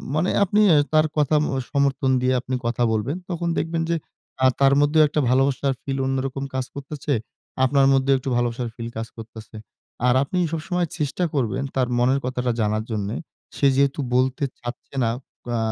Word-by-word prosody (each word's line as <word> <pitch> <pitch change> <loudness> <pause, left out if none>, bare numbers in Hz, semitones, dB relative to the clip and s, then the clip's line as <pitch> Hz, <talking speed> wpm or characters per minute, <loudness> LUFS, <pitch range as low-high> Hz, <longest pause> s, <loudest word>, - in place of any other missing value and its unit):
মানে 160 +4 +1
আপনি 205 +2 +1 0.2
এ - - +6 0.2
তার 155 0 +5
কথা 150 +1 +3 0.2
এ - - 0
সমর্থন 140 -2 +1
দিয়ে 130 0 +2
আপনি 130 +1 -3
কথা 120 +1 0
বলবেন, 125 +10 -1
তখন 170 -1 -2
দেখবেন 165 0 -1
যে, 170 - +2 0.5
আ - - +6
তার 135 0 +5
মধ্যেও 155 +2 +5
একটা 150 - -1
ভালোবাসার 135 +1 +2
ফিল 135 -1 -3
অন্যরকম 135 +1 -2
কাজ 130 -1 -1
করতেছে। 140 +1 -4 0.5
আপনার 135 +1 +4
মধ্যেও 135 0 +3
একটু 130 - -4
ভালোবাসার 120 0 -1
ফিল 115 -1 -5
কাজ 115 0 -3
করতেছে। 110 0 -11 0.5
আর 125 - +5
আপনি 180 +6 -4
সবসময় 175 +2 -1
চেষ্টা 150 +4 -1
করবেন, 135 -1 0
তার 130 -2 +2
মনের 130 +3 +3
কথাটা 125 -1 -1
জানার 110 0 0
জন্যে। 105 0 -2 0.4
সে 140 - +4
যেহেতু 140 +1 +2 0.2
বলতে 130 +3 +1 0.2
চাচ্ছে 120 +3 -8
না, 115 - +2 0.5
আ - - 0
135 Hz, 175 wpm, -23 LUFS, 125-145 Hz, 0.5 s, এ